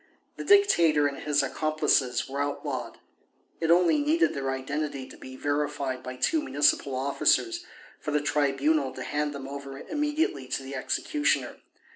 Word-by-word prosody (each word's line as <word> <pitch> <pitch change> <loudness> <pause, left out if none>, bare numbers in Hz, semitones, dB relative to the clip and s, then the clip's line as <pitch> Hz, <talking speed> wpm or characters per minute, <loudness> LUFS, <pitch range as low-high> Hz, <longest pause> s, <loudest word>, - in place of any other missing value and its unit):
The - - -6
Dictator 170 - +5
and 140 -1 -2
his 145 -1 +1
accomplices 150 -3 +1
were 140 +1 -3
outlawed; 145 0 -4 0.6
it 165 - -1
only 175 - +5
needed 320 +4 +2
their 135 -1 -3
identity 135 +1 -3
to - - -12
be 130 0 -11
verified 145 -2 -2
by 130 0 -7
two 315 - +1
municipal 145 - +2
officers 240 - +1 0.4
for - - -5
the 150 0 +2
Tribunal 145 0 +1
to 130 - -6
hand 150 +2 -1
them 140 -2 -7
over 140 -1 -7
immediately 295 - -1
to 135 - -3
the 135 +1 -8
executioner. 135 - -1
145 Hz, 150 wpm, -27 LUFS, 135-160 Hz, 0.6 s, Dictator